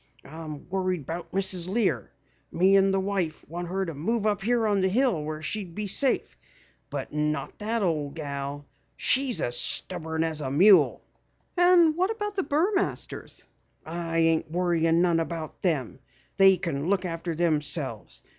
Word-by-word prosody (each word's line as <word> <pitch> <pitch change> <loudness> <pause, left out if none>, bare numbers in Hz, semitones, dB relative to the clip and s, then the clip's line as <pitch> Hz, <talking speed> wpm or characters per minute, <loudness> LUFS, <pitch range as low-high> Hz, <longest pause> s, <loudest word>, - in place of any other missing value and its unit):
"I'm 155 0 -9
worried 185 -3 -1
about 165 +6 -6
Mrs. 185 -2 0
Lear. 210 0 0 0.4
Me 190 +3 +4
and 195 0 +4
the 195 - +1
wife 190 -4 -2
want 175 +2 -5
her 190 +2 -2
to 165 - -5
move 210 +10 -2
up 210 -1 +1
here 235 +2 +1
on 205 -2 +2
the 190 - +3
hill 225 - +1
where 155 +1 -5
she'd 190 -3 -4
be 210 - -3
safe, 255 +7 0 0.5
but - - -5
not 150 0 -2
that 220 +1 -1
ole 155 -5 0
gal. 140 -1 -6 0.3
She's 260 -2 +2
as 120 - 0
stubborn 160 +3 +1
as 160 -2 -1
a 135 - -3
mule." 185 +8 +5 0.5
"And 350 -3 +5
what 370 +3 +1
of 415 0 -2
the 395 - 0
Burmasters?" 360 +7 -1 0.4
"I 165 0 -4
ain't 165 -1 +2
worryin' 170 -1 +2
none 170 -2 +2
about 165 -1 -5
them. 140 - -1 0.4
They 195 -1 +6
kin 165 -3 -3
look 195 -1 +1
after 165 -1 -4
themselves. 150 - -1
175 Hz, 160 wpm, -26 LUFS, 160-200 Hz, 0.5 s, They